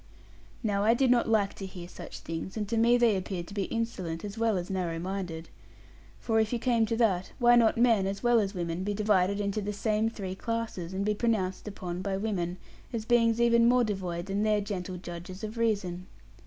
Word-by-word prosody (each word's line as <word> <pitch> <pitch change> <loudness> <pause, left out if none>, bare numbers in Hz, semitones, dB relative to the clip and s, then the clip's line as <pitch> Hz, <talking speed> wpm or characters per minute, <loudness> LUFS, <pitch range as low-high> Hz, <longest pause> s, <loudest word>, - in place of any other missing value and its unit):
Now 200 -2 +1
I 225 +2 +5
did 255 0 +3
not 240 -2 +3
like 210 -3 +2
to 195 - -7
hear 180 -2 -9
such - - -9
things; 165 +5 -5
and 210 -1 -2
to 230 - 0
me 235 +2 +5
they 235 -4 +4
appeared 185 -2 -3
to - - -9
be 200 -2 -1
insolent, 190 -7 -3
as 200 0 -6
well 225 -3 +1
as 175 0 -3
narrow 180 -4 -2
minded. 175 -2 -4 0.7
For 225 -2 +1
if 220 -1 +1
you 240 - +1
came 230 -2 +2
to 225 - -1
that, 195 -6 +1
why 240 -2 +5
might 240 - +7
not 220 - +2
men, 230 -5 +4
as 195 +3 -4
well 240 -1 +5
as 200 -1 -1
women, 170 0 -2
be 205 +1 -2
divided 200 -2 +2
into 205 +1 -1
the 205 +1 -3
same 215 +2 +1
three 195 -5 -5
classes, 225 -4 -3
and 195 +1 -2
be 210 - +2
pronounced 210 -4 -1
upon 180 -3 -5
by 195 0 -2
women, 185 -4 -2 0.3
as 225 -2 -3
beings 230 -1 +3
even 235 0 +5
more 250 0 +4
devoid 185 -5 -3
than 200 +1 -1
their 215 -1 +3
gentle 190 -3 -4
judges 175 +2 -8
of 215 +1 -5
reason? 200 -6 -1
205 Hz, 220 wpm, -29 LUFS, 185-230 Hz, 0.7 s, might